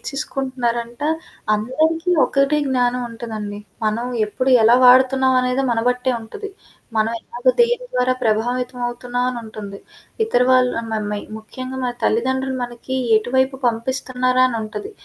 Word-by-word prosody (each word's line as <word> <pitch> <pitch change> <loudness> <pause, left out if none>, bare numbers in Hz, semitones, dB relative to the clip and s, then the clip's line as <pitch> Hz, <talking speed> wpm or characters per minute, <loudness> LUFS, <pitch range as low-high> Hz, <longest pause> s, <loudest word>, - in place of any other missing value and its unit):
నేర్చికుంటున్నారంట. 255 -4 -3 0.5
అందరికీ 315 +10 0 0.2
ఒకటే 275 +2 +2
జ్ఞానవుంటుందండి. 235 -4 -2 0.3
మనం 220 +3 -1 0.2
ఎప్పుడు, 255 +5 -1
ఎలా 235 +2 +6
వాడుతున్నావనేదే 260 0 +4
మన 225 - 0
బట్టే 250 +1 -1
ఉంటది. 405 - -8 0.5
మనం 220 +1 +2
ఎలాగ 245 +2 -3
దేని 480 +1 +3
ద్వారా 250 0 +2
ప్రభావితవవుతున్నావనుంటుంది. 240 -2 -2 0.5
ఇతర 250 - +1
వాళ్ళు 255 -1 +4
అన్ 230 - -8
మ - - 0 0.2
మే 210 - -2 0.2
ముఖ్యంగా 255 +4 -8
మన 245 -1 -1
తల్లిదండ్రులు 260 +3 0
మనకి 245 +2 -6 0.2
ఎటువైపు 260 +4 +1
పంపిస్తున్నారా 255 +2 0
అనుంటది. 230 - -5
250 Hz, 110 wpm, -20 LUFS, 235-260 Hz, 0.5 s, ఎలా